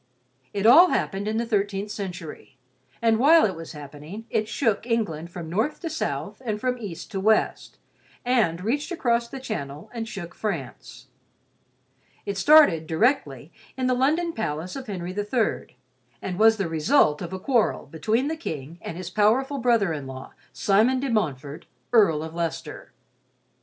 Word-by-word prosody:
It 200 0 -2
all 340 +11 +8
happened 200 +1 -1
in 220 +1 -1
the 235 - 0
thirteenth 205 -2 -1
century, 180 -9 -7 0.5
and 225 -1 +3
while 315 +5 +6
it 190 -4 -1
was 165 0 -9
happening, 150 +8 -9
it 215 -1 0
shook 225 -2 0
England 170 -9 -1
from 170 -2 -7
north 220 - -1
to 330 - -4
south 320 - -4
and 215 -3 -2
from 250 +1 -1
east 195 -8 -7
to 195 - -3
west; 215 +3 +1 0.5
and 215 -9 +1
reached 285 - -1
across 235 -8 0
the 270 +3 -8
channel 150 - -6
and 230 -2 -4
shook 180 -6 -7
France. 170 - -6 1.2
It 200 - -3
started, 195 - +5
directly, 235 - 0 0.3
in 260 - -1
the 255 - +2
London 315 +7 +1
palace 170 - -4
of 265 -2 -7
Henry 180 -3 -4
III, 210 - -2 0.4
and 185 +4 -5
was 220 0 +6
the 195 -4 -1
result 160 - +2
of 175 -1 -5
a 190 - -4
quarrel 235 +2 +1
between 220 - -1
the 320 - -2
King 160 - -7
and 165 - -6
his 180 -1 -6
powerful 250 +8 +2
brother 230 -8 +2
in 145 -3 -6
law, 130 0 -9 0.2
Simon 220 +6 +2
de 270 -1 -2
Montfort, 145 - -2 0.3
Earl 165 -10 +4
of 160 0 -7
Leicester. 165 -1 -5
210 Hz, 165 wpm, -25 LUFS, 165-245 Hz, 1.2 s, all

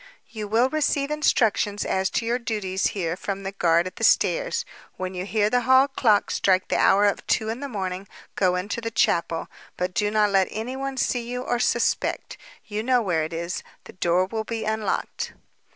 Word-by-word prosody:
"You 215 -2 -6
will 230 +4 +3
receive 290 -1 0
instructions 220 -8 +1
as 190 0 0
to 230 - -1
your 240 +2 0
duties 205 -5 -1
here 170 -3 -1
from 195 +1 -5
the 195 - -3
guard 170 -3 +2
at 185 - -7
the - - -5
stairs. - - +2 0.3
When 185 0 -4
you 180 +1 -4
hear 210 -1 +2
the 245 +3 +2
hall 260 +2 +5
clock 220 -7 +2
strike 185 -1 +2
the - - +1
hour 205 +1 +5
of 200 - 0
two 220 - +1
in 230 +2 -3
the 280 0 -5
morning 190 -3 -4 0.3
go 185 -2 +2
into 200 +5 -3
the 230 - -3
chapel, 170 -6 +1 0.3
but 180 +1 -2
do 205 +2 +1
not 210 -1 +2
let 195 -1 +3
anyone 265 +5 -4
see 240 -2 -1
you 250 0 -3
or 240 - -1
suspect. - - 0 0.3
You 210 -1 -3
know 250 +1 +2
where 170 -5 +1
it 155 - -5
is. 170 +2 -3 0.2
The - - -13
door 180 0 +2
will 220 +3 -3
be 225 0 -4
unlocked." 220 0 -2
210 Hz, 200 wpm, -24 LUFS, 185-240 Hz, 0.3 s, hall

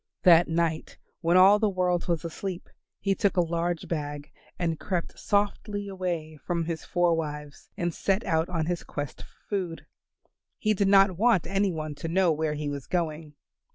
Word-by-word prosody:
That 170 -1 +7
night 165 -1 -1 0.2
when 175 +1 +3
all 195 +3 +7
the 215 -1 +2
world 180 -2 0
was 170 -1 -1
asleep 180 +2 -5 0.3
he 195 0 +1
took 200 -1 0
a - - +6
large 170 0 -2
bag, 145 -3 -4 0.3
and 165 -3 -1
crept 180 -4 -3
softly 205 0 -1
away 175 -5 -4
from 170 +3 -2
his 165 -1 -4
four 175 -1 +2
wives 150 -2 -5
and 175 -1 -1
set 195 +5 0
out 160 -3 +1
on 165 -3 -1
his 175 +1 -2
quest 145 -2 -6
for - - -17
food. 185 -5 -3 0.7
He 215 0 +1
did 200 -1 +1
not 195 -2 +5
want 225 -6 +4
any 195 +2 +1
one 155 -2 -4
to - - -5
know 180 +1 +3
where 155 -1 -1
he 150 0 -4
was 140 -2 -5
going. 155 -3 -2
170 Hz, 180 wpm, -27 LUFS, 160-190 Hz, 0.7 s, That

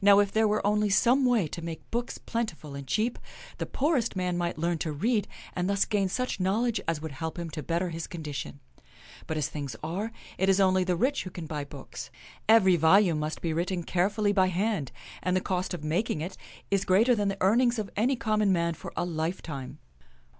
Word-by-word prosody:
Now, 200 0 +8
if 200 -1 +3
there 220 +1 +3
were 210 0 0
only 210 0 +2
some 250 +7 +4
way 235 -9 +3
to 170 - -6
make 165 -1 -7
books 240 +1 -2
plentiful 190 -11 -4
and 140 -1 -7
cheap, 220 - 0 0.4
the - - -2
poorest 265 -7 +1
man 180 -1 0
might 175 -1 -1
learn 170 +1 0
to 155 - -2
read 210 - +1 0.3
and 180 +1 0
thus 200 0 +3
gain 200 -3 +1
such 255 +2 -2
knowledge 215 +4 +1
as 165 -2 0
would 160 - -4
help 160 +5 -5
him 170 -2 -4
to 150 - -4
better 170 +5 -1
his 165 0 -5
condition. 150 -4 -6 0.7
But, 160 - -2
as 150 -1 0
things 140 -6 -5
are, 190 +8 -3 0.3
it 190 +1 +3
is 195 0 +4
only 185 -1 +4
the 180 -1 +1
rich 265 +10 +1
who 185 - -6
can 175 -2 -7
buy 150 -2 -4
books. 140 -1 -9 0.4
Every 190 -5 +6
volume 165 +1 +5
must 155 0 -3
be 165 -2 -1
written 175 +2 -1
carefully 205 +4 +1
by 190 -2 +4
hand, 185 - -1 0.3
and 180 +2 +1
the - - +3
cost 185 -1 -2
of 175 -5 -4
mak 170 +9 0
ing - - -1
it 180 +4 -4 0.4
is 195 -1 +2
greater 210 +7 +4
than 205 -3 +1
the 195 0 -1
earnings 235 +5 +3
of 210 -2 -3
any 245 +6 +2
common 215 -5 +1
man 170 -2 +1
for - - -8
a - - +1
lifetime." 155 -5 -4
185 Hz, 215 wpm, -28 LUFS, 160-210 Hz, 0.7 s, Now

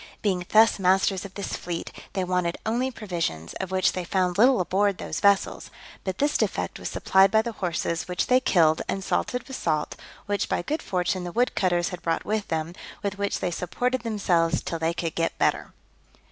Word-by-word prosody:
Being 180 -4 0
thus 220 0 +5
masters 190 +1 +2
of 195 - -10
this 200 - -4
fleet, 170 -1 -5 0.2
they 190 - 0
wanted 180 -1 0
only 240 +4 0
provisions, 170 - -4
of 190 - -3
which 190 0 +2
they 185 - -4
found 180 0 0
little 245 +4 +5
aboard 195 +2 +1
those 155 - -4
vessels: 200 +2 +2 0.3
but 190 -1 -3
this 290 +1 +1
defect - - -1
was - - -4
supplied 190 +1 +4
by 220 +2 +3
the 235 - -3
horses, 170 -4 -2
which 180 -1 -1
they 255 0 +4
killed, 165 -10 +3
and 195 - -2
salted 250 +5 -1
with 265 - -6
salt, 155 -2 -1 0.3
which 205 -1 -1
by - - 0
good 305 - -2
fortune 180 0 -1
the 175 - -5
wood 245 +6 +1
cutters 175 -2 +1
had 180 -2 -7
brought 165 -1 -1
with 215 -1 -1
them, 160 +1 -2 0.3
with 200 0 -3
which 200 0 -1
they 180 - -1
supported 245 +9 -1
themselves 180 -7 +1
till 165 - -3
they 165 +1 0
could 165 -2 -2
get 165 0 -1
better. - - +1
185 Hz, 200 wpm, -25 LUFS, 175-210 Hz, 0.3 s, thus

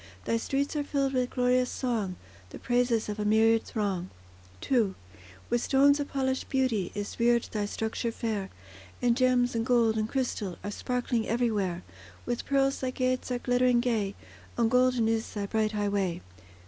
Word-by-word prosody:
Thy 230 - +1
streets 275 +5 -1
are 295 - 0
filled 275 -1 -1
with 250 -1 +1
glorious 250 0 +2
song, 220 -8 -2 0.3
The - - -9
praises 245 -2 +1
of 210 0 -4
a - - 0
myriad 220 +2 +3
throng. 195 -5 -2 0.6
II 225 -7 +3 0.5
With 240 0 +1
stones 280 +2 +4
of 285 - -2
polished 265 -1 -2
beauty 255 -9 0
Is 205 +3 -5
reared 235 0 +3
thy 210 -2 -1
structure 220 +2 -2
fair; 215 -4 -3 0.5
And 240 -1 +2
gems, 250 -1 +2
and 230 -1 0
gold, 230 -2 +3
and 215 0 -1
crystal 235 -8 -2
Are 205 - -4
sparkling 245 0 -1
everywhere; 210 -7 0 0.4
With 240 -1 -3
pearls 275 0 +2
thy 260 - -1
gates 255 0 -1
are 250 - 0
glittering 245 0 +2
gay, 220 -5 0 0.4
And 230 -1 +2
golden 250 -2 +3
is 225 0 -1
thy 205 -1 -2
bright 215 +1 0
highway. 200 - -1
235 Hz, 165 wpm, -28 LUFS, 215-255 Hz, 0.6 s, stones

